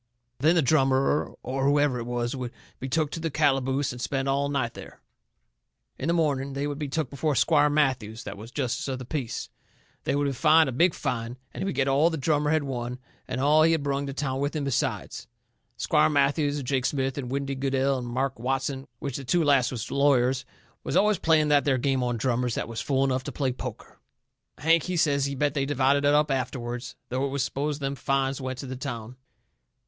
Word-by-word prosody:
Then 160 Hz, +4 st, +4 dB
the 165 Hz, -, +3 dB
drummer, 135 Hz, 0 st, +2 dB
or 135 Hz, +2 st, -2 dB
whoever 145 Hz, -2 st, +3 dB
it 115 Hz, -, -5 dB
was, 120 Hz, +1 st, -2 dB
would 125 Hz, -2 st, -4 dB, 0.3 s
be 135 Hz, -, -5 dB
took 155 Hz, +1 st, 0 dB
to -, -, -4 dB
the 165 Hz, 0 st, -2 dB
calaboose, 135 Hz, -2 st, +1 dB
and 125 Hz, -1 st, -8 dB
spend 135 Hz, +1 st, -1 dB
all 140 Hz, +1 st, +1 dB
night 135 Hz, -5 st, -1 dB
there. -, -, -11 dB, 1.0 s
In 135 Hz, -, -3 dB
the 170 Hz, -, +2 dB
morning 140 Hz, -4 st, 0 dB
they 140 Hz, +1 st, -2 dB
would 145 Hz, 0 st, -4 dB
be 150 Hz, -, -2 dB
took 145 Hz, -1 st, -2 dB
before 145 Hz, +1 st, -1 dB
Squire 150 Hz, +3 st, +4 dB
Matthews, 130 Hz, -7 st, 0 dB
that 100 Hz, -, -6 dB
was 110 Hz, +3 st, -10 dB
justice 130 Hz, -1 st, -2 dB
of 130 Hz, -1 st, -2 dB
the 130 Hz, -, -8 dB
peace. 130 Hz, -4 st, -4 dB, 0.6 s
They -, -, +1 dB
would 145 Hz, 0 st, +1 dB
be 140 Hz, -, +1 dB
fined 155 Hz, +2 st, +5 dB
a -, -, -2 dB
big 165 Hz, +7 st, +3 dB
fine, 115 Hz, +1 st, -3 dB, 0.2 s
and -, -, -6 dB
he -, -, -1 dB
would 195 Hz, -, -2 dB
get 135 Hz, -, +1 dB
all 140 Hz, +5 st, +4 dB
the 160 Hz, -, -3 dB
drummer 150 Hz, +1 st, +1 dB
had 155 Hz, -1 st, +2 dB
won 125 Hz, -2 st, -4 dB, 0.3 s
and 130 Hz, 0 st, -3 dB
all 150 Hz, +3 st, +4 dB
he 165 Hz, +1 st, +5 dB
had 160 Hz, -3 st, 0 dB
brung 140 Hz, 0 st, -1 dB
to 135 Hz, -, -4 dB
town 135 Hz, -2 st, -2 dB
with 145 Hz, +2 st, -1 dB
him 150 Hz, -, -1 dB
besides. 135 Hz, -6 st, -2 dB, 0.5 s
Squire 150 Hz, +5 st, +3 dB
Matthews 145 Hz, 0 st, +2 dB
and 140 Hz, -, -5 dB
Jake 130 Hz, 0 st, +1 dB
Smith 135 Hz, -2 st, -1 dB
and 125 Hz, -3 st, -5 dB
Windy 140 Hz, +1 st, -2 dB
Goodell 135 Hz, 0 st, 0 dB
and 120 Hz, -, -6 dB
Mart 130 Hz, +1 st, -2 dB
Watson, 135 Hz, +2 st, -2 dB
which 135 Hz, +1 st, -4 dB
the 140 Hz, -, -7 dB
two 165 Hz, +7 st, +2 dB
last 140 Hz, -5 st, +4 dB
was 120 Hz, -4 st, -5 dB
lawyers, 130 Hz, -2 st, +2 dB, 0.4 s
was -, -, -3 dB
always 210 Hz, 0 st, +3 dB
playing 155 Hz, -2 st, +3 dB
that 145 Hz, -1 st, +4 dB
there 135 Hz, -3 st, +2 dB
game 135 Hz, +1 st, +1 dB
on 120 Hz, -1 st, -1 dB
drummers 125 Hz, 0 st, 0 dB
that -, -, -2 dB
was 115 Hz, -1 st, -4 dB
fool 135 Hz, -1 st, +1 dB
enough 130 Hz, -1 st, 0 dB
to 145 Hz, -, -4 dB
play 135 Hz, 0 st, -1 dB
poker. 125 Hz, -, -8 dB, 0.6 s
Hank, 165 Hz, +4 st, +3 dB
he 180 Hz, +2 st, -3 dB
says 140 Hz, -4 st, +2 dB
he 140 Hz, -, -4 dB
bet 145 Hz, 0 st, +1 dB
they 140 Hz, -2 st, -1 dB
divided 140 Hz, 0 st, +2 dB
it 145 Hz, -, +4 dB
up 150 Hz, 0 st, +3 dB
afterward, 125 Hz, -2 st, -2 dB, 0.3 s
though 130 Hz, +2 st, -1 dB
it 140 Hz, -, 0 dB
was 140 Hz, -1 st, -1 dB
supposed 145 Hz, +2 st, -2 dB
them 135 Hz, 0 st, -1 dB
fines 135 Hz, 0 st, -1 dB
went 130 Hz, -1 st, -4 dB
to 135 Hz, -, -6 dB
the 130 Hz, 0 st, -5 dB
town. 125 Hz, -3 st, -6 dB
135 Hz, 225 wpm, -26 LUFS, 130-145 Hz, 1.0 s, fined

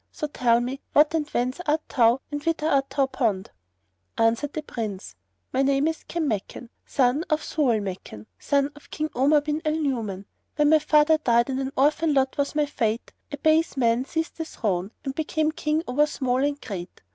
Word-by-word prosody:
So 305 Hz, -, -4 dB
tell 240 Hz, -5 st, +2 dB
me, 260 Hz, +3 st, -4 dB
what 300 Hz, +2 st, +5 dB
and 305 Hz, -2 st, -1 dB
whence 255 Hz, +6 st, -1 dB
art 305 Hz, +1 st, 0 dB
thou 240 Hz, 0 st, +3 dB
and 290 Hz, 0 st, -4 dB
whither 330 Hz, -2 st, -1 dB
art 275 Hz, -3 st, +2 dB
thou 275 Hz, -1 st, +1 dB
bound?" 220 Hz, -8 st, -1 dB, 0.7 s
Answered 230 Hz, +6 st, +1 dB
the 310 Hz, -, -4 dB
Prince, 215 Hz, -, -6 dB, 0.4 s
"My 265 Hz, -, +2 dB
name 275 Hz, +2 st, +2 dB
is 320 Hz, 0 st, -3 dB
Kanmakan, 245 Hz, -, -3 dB, 0.2 s
son 270 Hz, +3 st, +2 dB
of 305 Hz, 0 st, +1 dB
Zau 275 Hz, -7 st, +1 dB
al 215 Hz, -, -1 dB
Makan, 180 Hz, -, -7 dB
son 280 Hz, 0 st, +1 dB
of 295 Hz, -, -17 dB
King 310 Hz, 0 st, -3 dB
Omar 290 Hz, +4 st, +4 dB
bin 300 Hz, +1 st, -2 dB
al 310 Hz, 0 st, 0 dB
Nu'uman. 230 Hz, -11 st, -2 dB, 0.3 s
When 295 Hz, -1 st, +3 dB
my 315 Hz, 0 st, +6 dB
father 305 Hz, +1 st, +4 dB
died 235 Hz, -2 st, +2 dB
and 260 Hz, -, -2 dB
an 270 Hz, 0 st, -3 dB
orphan 300 Hz, +2 st, +2 dB
lot 265 Hz, -1 st, +2 dB
was 285 Hz, +1 st, 0 dB
my 300 Hz, -1 st, +2 dB
fate, 230 Hz, -5 st, -2 dB, 0.2 s
a 285 Hz, -, -4 dB
base 315 Hz, +1 st, +2 dB
man 235 Hz, -1 st, +2 dB
seized 325 Hz, +3 st, -3 dB
the 325 Hz, -, -2 dB
throne 195 Hz, -, -2 dB, 0.2 s
and 270 Hz, -, -2 dB
became 315 Hz, +1 st, 0 dB
King 310 Hz, 0 st, -1 dB
over 295 Hz, +4 st, +2 dB
small 260 Hz, -2 st, 0 dB
and 285 Hz, 0 st, -1 dB
great." 185 Hz, -, -8 dB
280 Hz, 195 wpm, -25 LUFS, 240-305 Hz, 0.7 s, my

